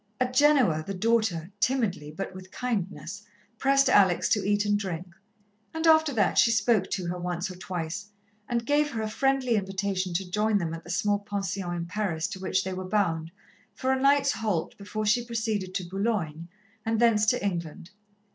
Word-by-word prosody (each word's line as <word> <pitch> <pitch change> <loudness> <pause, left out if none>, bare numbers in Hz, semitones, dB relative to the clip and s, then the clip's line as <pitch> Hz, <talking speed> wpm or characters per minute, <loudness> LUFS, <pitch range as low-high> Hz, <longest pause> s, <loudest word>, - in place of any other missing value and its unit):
At 255 0 0
Genoa 255 - +4
the 195 - -3
daughter, 205 -5 +1
timidly, 215 - 0
but 190 +5 -6
with 185 0 -10
kindness, 200 -6 -4 0.4
pressed 275 0 +4
Alex 190 -8 +4
to 210 - +2
eat 205 +1 +1
and 205 0 +2
drink, 185 -4 -3 0.7
and 320 +1 -1
after 315 -2 +5
that 205 -6 +2
she - - +6
spoke 220 -3 +2
to 185 - -2
her 175 +1 -3
once 180 +1 -3
or - - -9
twice, 180 +2 -5 0.4
and 235 -1 -1
gave 295 +2 +2
her 225 -5 -3
a - - -1
friendly 265 -1 +1
invitation 195 -1 -2
to 190 +1 -1
join 210 +3 +1
them 165 -4 -2
at 165 0 -7
the - - -13
small 205 +3 +1
pension 195 -3 -3
in 170 -1 -3
Paris 175 -3 -2
to 190 - -7
which 185 0 0
they 190 - -4
were 185 0 -4
bound, 165 -6 0 0.5
for 260 0 0
a 260 - -1
night's 275 0 +4
halt 210 - -2
before 215 +2 -4
she 235 +3 +3
proceeded 220 -5 -2
to 180 - -2
Boulogne 180 -5 -2 0.4
and 225 0 0
thence 220 -3 +4
to 245 -2 +2
England. 175 -1 -4
200 Hz, 185 wpm, -27 LUFS, 180-230 Hz, 0.7 s, she